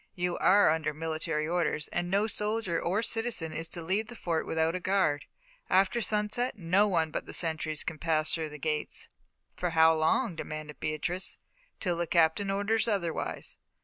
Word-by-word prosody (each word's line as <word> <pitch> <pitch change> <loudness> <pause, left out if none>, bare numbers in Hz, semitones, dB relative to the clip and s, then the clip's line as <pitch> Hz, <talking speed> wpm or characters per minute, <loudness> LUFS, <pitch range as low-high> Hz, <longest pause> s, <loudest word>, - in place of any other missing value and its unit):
You 180 -1 -1
are 200 -3 +6
under 155 -2 -1
military 155 -1 -2
orders, 165 -3 0
and 175 0 -1
no 200 +3 +2
soldier 210 -4 -1
or 195 +6 0
citizen 225 -9 -1
is 165 +1 -4
to 170 +1 -4
leave 195 +6 0
the 240 - -10
Fort 170 -6 -2
without 160 0 +1
a 185 - -2
guard. 180 -6 +1 0.4
After 195 +5 +3
sunset 215 +4 0
no 190 +3 +3
one 165 -5 +1
but - - -4
the - - -7
sentries 160 -2 -1
can 160 -2 -5
pass 155 -1 +1
the 155 -2 -3
gates." 150 0 -3 0.5
"For 180 - -1
how 160 -1 +6
long?" 165 +6 +1
demanded 155 -1 -6
Beatrice. 155 +5 -3 0.4
"Till 175 -4 -1
the 170 0 -1
Captain 170 +4 +3
orders 210 +3 +1
otherwise." 190 -7 -2
170 Hz, 170 wpm, -30 LUFS, 160-200 Hz, 0.5 s, are